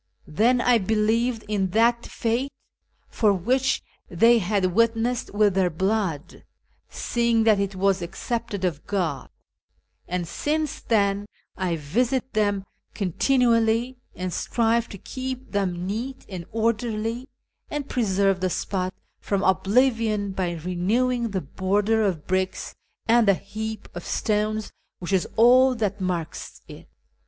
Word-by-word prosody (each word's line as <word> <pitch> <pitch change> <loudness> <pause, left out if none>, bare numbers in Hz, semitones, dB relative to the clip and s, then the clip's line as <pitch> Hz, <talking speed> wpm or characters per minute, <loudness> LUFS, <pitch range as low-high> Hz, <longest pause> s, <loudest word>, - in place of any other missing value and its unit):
'" - - -43
Then 230 +11 +3
I 245 -1 +4
believed 220 +3 +1
in 200 -3 0
that 235 +1 +3
faith 240 +4 -1 0.6
for 215 -3 +2
which 250 +8 +1 0.3
they 230 +7 +5
had 190 -2 0
witnessed 230 +2 +1
with 205 -1 +3
their 185 -1 +2
blood, 185 -3 -2 0.5
seeing 235 -1 +1
that 215 -3 +4
it 200 -1 -2
was 195 0 +1
accepted 205 +2 -3
of 160 -5 -3
God; 170 -10 -2 0.8
and 175 -1 -2
since 305 - -2
then 200 -2 +1 0.3
I 185 -3 -1
visit 240 - -1
them 205 -2 +1 0.3
continually, 230 - +2 0.2
and 185 -1 -4
strive 235 0 +1
to 200 - -8
keep 260 +4 -6
them 180 -3 -1
neat 235 +7 -4
and 180 -4 -7
orderly, 230 +2 -1 0.4
and 290 -2 -4
preserve 195 -6 +1
the 185 - +1
spot 185 +1 -2 0.2
from 200 -1 -1
oblivion 210 +1 +2
by 185 -2 -2
renewing 220 +9 0
the 195 -2 -2
border 205 +8 0
of 180 -7 -1
bricks 185 0 -1 0.3
and 230 -1 +4
the 200 - +6
heap 215 +2 -6
of 175 - -7
stones 215 0 -1 0.3
which 180 +2 -5
is 185 - +2
all 250 +3 +6
that 205 -3 -2
marks 175 -4 -4
it." - - -12
210 Hz, 130 wpm, -24 LUFS, 185-235 Hz, 0.8 s, the